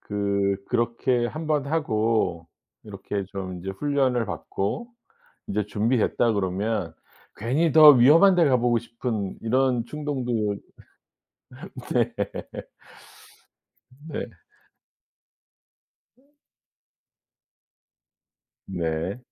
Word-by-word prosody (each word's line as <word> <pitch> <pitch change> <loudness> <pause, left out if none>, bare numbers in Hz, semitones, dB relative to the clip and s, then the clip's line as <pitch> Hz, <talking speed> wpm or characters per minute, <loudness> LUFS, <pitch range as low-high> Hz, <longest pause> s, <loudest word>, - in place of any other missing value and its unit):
그 100 -1 -1
그렇게 120 +1 0
1 155 +5 -6
번 150 -3 0
하고 110 - 0 0.4
이렇게 100 -1 -5
좀 95 -2 -6
이제 95 +2 -5
훈련을 130 +1 0
받고 165 - -4 0.6
이제 105 0 -1
준비됐다 115 +2 +1
그러면 95 -3 -2 0.4
괜히 140 +9 0
더 155 -1 +10
위험한 150 +9 +6
데 175 -2 +4
가 130 -3 +4
보고 120 -1 +2
싶은 115 -4 -4
이런 125 0 +1
충동도 125 -9 -2 1.4
네. - - +1 2.0
네. - - -5 1.9
어. 275 +3 -32 2.4
네. 85 +2 -3
115 Hz, 150 characters per minute, -25 LUFS, 100-135 Hz, 2.4 s, 더